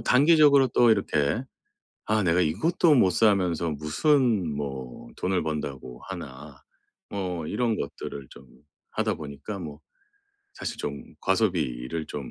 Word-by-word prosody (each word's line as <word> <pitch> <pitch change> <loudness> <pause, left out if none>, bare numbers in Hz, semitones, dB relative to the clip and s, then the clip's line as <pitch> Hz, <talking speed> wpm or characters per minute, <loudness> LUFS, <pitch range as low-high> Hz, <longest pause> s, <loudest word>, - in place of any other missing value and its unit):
단기적으로 140 -1 +5
또 120 0 +4
이렇게 95 - +1 0.6
'아 110 0 +1
내가 90 0 +2
이것도 155 - +2
못 115 -9 +5
사면서 90 -6 +2
무슨 95 - +1
뭐 65 -4 -6
돈을 95 -1 0
번다고 70 -5 -5
하나?' 65 +1 -9 0.5
뭐 90 -5 -4
이런 115 +3 0
것들을 70 -1 -6
좀 65 - -14 0.5
하다 - - -1
보니까 75 +8 -7
뭐 75 -5 -8 0.7
사실 - - -5
좀 70 0 -5 0.2
과소비를 65 +7 -1
좀 70 -3 -6
85 Hz, 245 characters per minute, -26 LUFS, 70-110 Hz, 0.7 s, 단기적으로